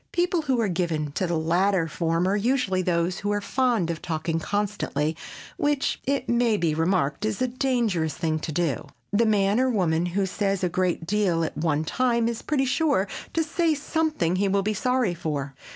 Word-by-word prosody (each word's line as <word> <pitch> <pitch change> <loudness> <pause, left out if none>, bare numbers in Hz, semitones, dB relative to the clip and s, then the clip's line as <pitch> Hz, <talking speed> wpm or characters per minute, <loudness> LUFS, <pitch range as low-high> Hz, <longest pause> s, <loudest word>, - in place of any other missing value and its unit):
People 350 -1 +1
who 265 -5 0
are 225 - +2
given 165 -5 -1
to 185 +5 -1
the 170 -1 0
latter 175 +2 +2
form 165 +2 0
are 195 - +2
usually 210 -4 +1
those 175 0 0
who 205 - -1
are 205 - +1
fond 230 -6 +1
of 165 - -6
talking 160 0 -2
constantly 175 -6 -1 0.4
which—it 280 -2 0
may 235 -2 +2
be 165 -4 +1
remarked—is 180 +4 0
a 255 - +1
dangerous 235 - 0
thing 160 -2 -1
to 155 - -4
do. 155 -5 -1 0.3
The 225 +2 +3
man 205 0 +3
or 260 0 +3
woman 175 -6 +1
who 190 +3 0
says 195 0 -1
a 180 - +2
great 180 -1 0
deal 185 -3 +1
at 160 - -3
one 155 0 0
time 235 +6 +1
is 235 -1 -3
pretty 280 -3 0
sure 275 - +1 0.3
to 325 - +2
say 330 0 +1
something 295 - 0
he 200 +1 +2
will 195 0 +1
be 215 +2 0
sorry 250 -2 +1
for. 145 -5 -3
195 Hz, 185 wpm, -25 LUFS, 165-240 Hz, 0.4 s, The